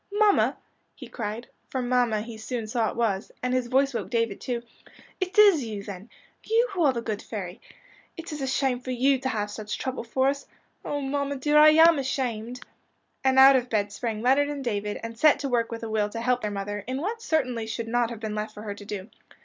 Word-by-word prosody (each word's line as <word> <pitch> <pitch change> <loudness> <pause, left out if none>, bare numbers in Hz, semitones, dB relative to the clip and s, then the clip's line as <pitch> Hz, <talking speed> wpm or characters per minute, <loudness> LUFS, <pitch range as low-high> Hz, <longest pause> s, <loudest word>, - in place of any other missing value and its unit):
"Mamma," 415 0 +3 0.4
he - - -10
cried 225 +1 -5 0.2
for 260 - -2
mamma 245 -3 +1
he 230 +1 -8
soon 225 +1 -4
saw 220 0 0
it - - -7
was 215 -4 -1
and 250 0 0
his 255 -1 0
voice 270 +2 +2
woke - - -3
David 230 -4 -1
too, 240 -2 -3 0.6
"it 370 0 -3
is 400 -9 +7
you 210 -3 -5
then 200 +2 -9 0.3
you 465 +3 +2
who 375 -3 -2
are 285 - +5
the 235 -2 -4
good 215 -3 -3
fairy! 190 -5 -7 0.6
It 330 0 -7
is 300 - -5
a 270 - -1
shame 265 -1 0
for 255 - -9
you 260 +2 +2
to 260 0 -2
have 210 -4 -2
such 210 0 -5
trouble 260 -2 -4
for 260 +3 +1
us. 275 0 -4 0.4
Oh, 290 0 -3
mamma, 280 +1 -2
dear, 295 +3 +3
I 305 0 +9
am 320 0 +6
ashamed," 250 -3 -3 0.6
and 265 0 +3
out 270 +1 +9
of 250 -1 0
bed 205 -2 0
sprang 220 0 -4
Leonard 275 +3 +3
and 285 -2 -4
David, 210 -2 -2
and 230 0 -6
set 305 +2 +6
to 275 - -2
work 235 -2 0
with 230 0 -6
a - - -3
will 215 -1 0
to 230 +2 -5
help 250 +1 +1
their 210 - -2
mother, 205 0 -4
in 260 +1 -2
what 440 +8 -3
certainly 255 - -1
should 225 +1 -4
not 240 0 +1
have 235 -3 -7
been 215 -1 -4
left 215 0 -4
for 210 - -9
her 205 -2 -4
to 205 - -11
do. 200 -1 -6
245 Hz, 230 wpm, -26 LUFS, 220-275 Hz, 0.6 s, I